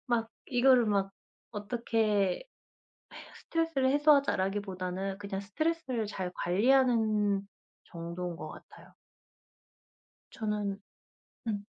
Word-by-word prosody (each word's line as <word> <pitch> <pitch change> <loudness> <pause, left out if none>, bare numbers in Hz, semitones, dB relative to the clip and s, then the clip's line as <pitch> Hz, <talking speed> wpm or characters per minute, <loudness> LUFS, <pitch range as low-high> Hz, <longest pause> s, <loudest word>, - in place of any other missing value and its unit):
막 230 -2 0 0.2
이거를 250 -2 +5
막 195 -2 +1 0.4
어떻게 215 - 0 1.0
'스트레스를 325 -6 +2
해소하자.'라기보다는 195 -10 +1
그냥 200 -1 -4
스트레스를 260 - -1
잘 185 -3 -4
관리하는 215 -1 +3 0.4
정도인 170 +1 -5
것 - - -7
같아요. - - -14 1.4
저는 210 -2 -2 0.7
음. 205 -2 -2
210 Hz, 225 characters per minute, -31 LUFS, 195-250 Hz, 1.4 s, 이거를